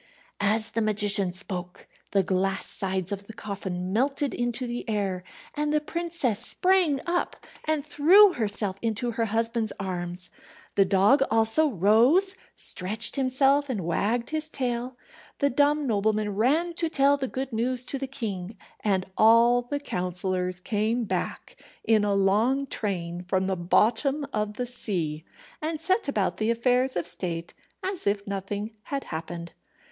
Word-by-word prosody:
As 215 +2 +1
the 230 - -1
magician 205 -3 +3
spoke 180 -1 -7 0.2
the 195 -1 +2
glass 195 +1 0
sides 190 -1 0
of 200 0 -5
the 225 - -9
coffin 190 -4 -5
melted 275 +4 0
into 240 +1 -2
the 240 0 -4
air, 195 -4 -1 0.3
and 295 0 -1
the 305 - +3
princess 330 -8 -2
sprang 360 -7 +2
up, 350 0 -1 0.3
and 310 -2 0
threw 360 +7 +6
herself 205 -3 -2
into 230 +1 -1
her 230 0 -1
husband's 225 0 -1
arms. 180 -1 -5 0.4
The 195 - +4
dog 200 +9 +4
also 225 +8 +4
rose, 245 - +4 0.2
stretched 210 +5 +1
himself, 275 +1 +2
and 205 -9 -2
wagged 225 - -1
his 310 0 -2
tail. 250 -2 -3 0.4
The 280 -1 +1
dumb 290 +3 +2
nobleman 210 -2 0
ran 305 - +1
to 330 - 0
tell 280 -2 +4
the 270 -1 -2
good 265 0 -5
news 245 +2 0
to 275 - -4
the 270 - -3
king, 215 -7 -5 0.3
and 190 -3 +1
all 230 +2 +6
the 285 +4 -4
counsellors 180 -5 -2
came 220 +5 -1
back 215 - -4 0.2
in 220 -2 +3
a 205 -1 +1
long 215 +8 +2
train 175 -8 -3
from 185 +1 -1
the 190 0 0
bottom 230 - +1
of 210 0 -2
the 250 - -2
sea, 175 -10 -2 0.4
and 315 0 -2
set 375 +3 0
about 210 -9 0
the 215 +1 0
affairs 250 +2 +1
of 175 - -1
state 170 -1 -4 0.3
as 375 - -3
if 200 0 0
nothing 200 +2 -4
had 280 -1 -3
happened. 170 +1 -6
220 Hz, 150 wpm, -26 LUFS, 195-270 Hz, 0.4 s, threw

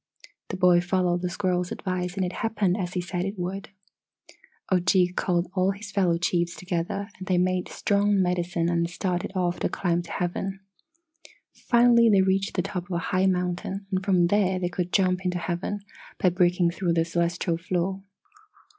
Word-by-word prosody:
"The - - -5
boy 180 -2 +5
followed 175 0 0
the 180 - -1
squirrel's 180 -1 -1
advice 180 -2 -3
and 190 -2 0
it 180 - -4
happened 215 -5 +1
as 185 -3 -3
he 180 - -1
said 175 0 -3
it 195 +2 -4
would. 185 +2 -4 1.0
"Ojeeg 180 0 +3
called 175 -1 0
all 190 0 +2
his 205 +1 -9
fellow 180 -4 +2
chiefs 170 0 0
together 190 +3 -3
and 185 - -8
they 185 - +2
made 185 0 +1
strong 205 0 +1
medicine 180 -2 0
and 170 -1 +1
started 180 0 -2
off 175 -1 0
to - - 0
climb 175 -2 0
to 175 - -11
Heaven. 190 +2 -3 0.9
"Finally 235 -1 +4
they 195 -3 +5
reached 195 +1 0
the 180 - +1
top 180 -2 -4
of 190 - -13
a - - +1 0.2
high 185 +1 +3
mountain 180 +2 -2
and 190 0 0
from 185 -3 +3
there 190 0 +2
they 180 -1 -1
could 180 0 -3
jump 185 -1 +2
into 180 -1 -1
heaven, 175 +4 -3 0.4
by 185 - +4
breaking 175 -1 +2
through 175 -1 -1
the 165 0 +2
celestial 170 0 -1
floor. 185 +2 -2
180 Hz, 180 wpm, -26 LUFS, 175-195 Hz, 1.0 s, boy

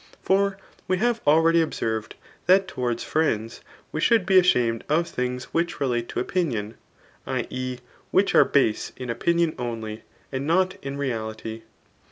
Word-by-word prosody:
For 195 0 +2 0.3
we 185 - +1
have 235 +3 +1
already 165 +2 +5
observed 110 -8 -2 0.3
that 190 +1 +5
towards 120 -8 -2
friends^ 115 -8 -1 0.3
we 155 - -3
should 230 -2 +4
be 190 0 +6
ashamed 120 -10 +2
of 165 +3 +2
things 125 -2 -4
which 170 -1 0
relate 120 -4 -1
to - - -3
opinion, 120 - -1 0.5
[i. - - -1
e. 130 0 -3 0.3
which 195 +1 +2
are - - +8
base 130 -6 +1
in 125 -2 -4
opinion 170 +6 +1
only, 110 -3 -4 0.3
and 135 +1 -3
not 185 +3 +2
in 140 0 -4
reality. 110 -4 -4
140 Hz, 150 wpm, -25 LUFS, 115-175 Hz, 0.5 s, are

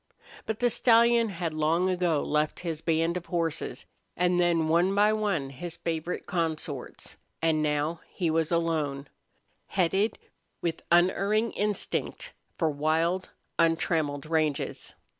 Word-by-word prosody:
But 220 - -2
the 245 -1 +3
stallion 235 0 +4
had 170 -4 -3
long 160 +4 +1
ago 175 -5 +1
left 150 0 0
his 165 -3 -4
band 165 +1 +1
of 175 - -8
horses, 165 -3 -2 0.3
and 180 0 +2
then, 170 -2 +2
one 175 +4 +3
by 210 +1 +4
one 200 -11 -1
his 165 +5 -6
favorite 165 +1 -3
consorts, 160 -6 -4 0.2
and 160 -1 +2
now 150 +2 0
he 170 -4 -1
was 160 0 0
alone, 155 -5 -1 0.6
headed 190 +4 +1 0.4
with 165 -2 -2
unerring 200 +6 +3
instinct 210 -1 -2 0.3
for 160 -2 +1
wild, 160 +5 0 0.3
untrammeled 160 -3 +1
ranges. 155 -2 -1
165 Hz, 125 wpm, -28 LUFS, 155-185 Hz, 0.6 s, stallion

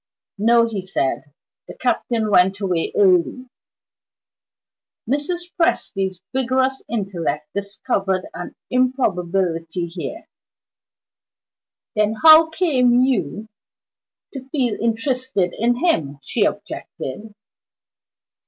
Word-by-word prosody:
"No," 230 +2 +4
he 205 -5 -4
said 160 -6 -2 0.4
"the - - -10
Captain 235 -3 0
went 190 +1 +4
away 180 -5 -1
early." 200 +7 +2 1.6
Mrs. 345 +7 -2
Presty's 195 - 0
vigorous 260 +1 +1
intellect 185 -8 -3
discovered 195 -1 -2
an 175 +1 -7 0.2
improbability 185 -9 0
here. 175 - -7 1.7
"Then 215 +1 +2
how 320 0 +9
came 255 -8 +3
you 220 - -1 0.9
to 270 -1 -8
feel 255 -7 0
interested 230 -4 -1
in 240 +2 +1
him?" 145 - +1
she - - +1
objected. 205 +11 -5
220 Hz, 90 wpm, -21 LUFS, 185-260 Hz, 1.7 s, how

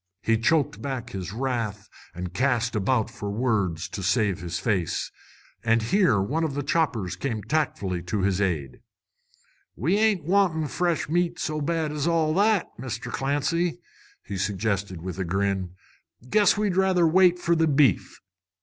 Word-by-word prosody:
He 115 - +3
choked 150 +4 +1
back 135 -4 -4
his 95 -2 -5
wrath 115 -4 -3 0.3
and 90 0 -5
cast 120 0 +1
about 110 +2 +1
for 100 - -6
words 100 -7 0
to 100 - -5
save 100 -1 +1
his 90 0 -3
face. 95 -6 -1 0.5
And 115 0 +2
here 160 - +3
one 145 +12 -1
of 150 -4 -2
his 145 - -2
choppers 120 - 0
came 115 -6 -3
tactfully 100 - -1
to 95 +4 -2
his 95 0 +1
aid. 80 -9 -2 0.9
"We 170 - +1
ain't 215 -6 +2
wantin' 170 -3 +2
fresh 175 -1 0
meat 175 +2 0
so 155 -3 -2
bad 160 0 -1
as 150 +1 -2
all 160 -2 +2
that, 205 +2 +3
Mr. 120 -1 -5
Clancy," 155 +7 0 0.4
he 100 -3 -5
suggested, 100 -3 -2
with 95 0 -5
a - - 0
grin. 95 0 -1 0.5
"Guess 205 +7 +4
we'd 205 -3 0
rather 190 -2 +3
wait 180 +2 +5
for 170 -1 +1
the 165 0 +2
beef." 145 -2 +2
125 Hz, 160 wpm, -25 LUFS, 100-165 Hz, 0.9 s, wait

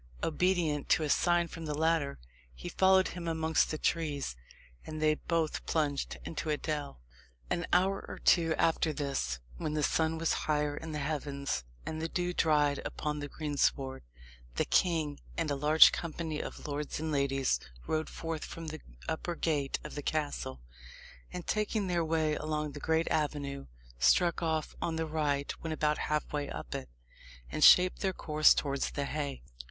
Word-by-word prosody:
Obedient 165 -3 +1
to 160 - +4
a 150 - -1
sign 175 -1 +3
from 165 -1 -7
the 150 - -2
latter, 160 -3 +1 0.4
he - - -7
followed 190 0 +4
him 175 -2 -6
amongst 160 -1 +2
the 155 - -2
trees, 150 - -1 0.5
and 155 0 -6
they 155 0 +4
both 160 0 -1
plunged 145 -3 0
into 160 -1 -4
a 150 - +1
dell. 145 - -4 0.5
An 170 - 0
hour 190 +2 +3
or - - -7
two 165 -3 +3
after 160 -1 +2
this, 140 - -2 0.2
when 155 - -2
the 150 - 0
sun 160 +1 +1
was 165 0 +1 0.2
higher 150 -1 +1
in 160 +2 -6
the 150 - -3
heavens, 140 - -2 0.2
and 160 0 -4
the 165 - -2
dew 180 +1 -1
dried 150 -4 +2
upon 150 0 -3
the 145 - -4
greensward, 140 -3 -1 0.5
the - - +1
king 160 -5 +1 0.2
and 165 -3 0
a - - +1
large 150 +3 +7
company 160 -2 -3
of - - -8
lords 145 0 -3
and 160 0 -2
ladies 135 -2 +1 0.3
rode 155 0 -1
forth 165 -2 -4
from 165 -1 -6
the 155 +1 -7 0.3
upper 170 +2 -2
gate 145 -5 0
of 150 - -7
the 145 - -4
castle, 145 - -2 0.7
and 180 - -6
taking 215 -1 0
their 175 -2 +1
way 160 -1 +1
along 150 0 -2
the 145 - -8
great 160 +2 +1
avenue, 145 -2 -1 0.3
struck 170 - +4
off 160 -2 -1
on 165 - -1
the 160 0 -1
right 150 -3 0
when 165 - -4
about 150 -1 +1
half 150 0 -1
way 145 -1 -2
up 75 -6 -6
it, 65 - -5 0.6
and - - 0
shaped 180 0 +8
their 190 -2 0
course 155 -3 +4
towards 140 -1 -1
the 140 - -3
haye. 140 -2 -3
155 Hz, 175 wpm, -31 LUFS, 145-165 Hz, 0.7 s, shaped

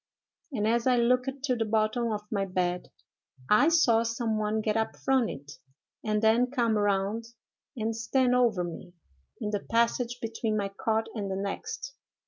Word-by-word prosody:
—and 215 -5 0
as 235 +2 +1
I 250 -1 +4
looked 250 +2 +3
to 260 -3 +1
the 230 - 0
bottom 220 +2 +1
of 210 -1 -3
my 200 -2 0
bed, 180 -2 -2 0.6
I 250 +9 +6
saw 255 -9 +4
some 230 -1 -1
one 215 +1 0
get 215 0 0
up 220 0 -1
from 265 -4 +1
it, 145 +1 -9 0.4
and 215 0 0
then 230 +3 +4
come 235 -4 +1
round 205 +2 0 0.5
and 225 0 -1
stand 250 +3 +1
over 235 -7 +3
me, 175 +1 -7 0.5
in 210 - -3
the 205 - 0
passage 235 +2 0
between 225 -2 -2
my 200 -1 -1
cot 220 +3 -1
and 205 -4 -3
the 190 - -2
next. 445 - -4
225 Hz, 170 wpm, -28 LUFS, 210-240 Hz, 0.6 s, I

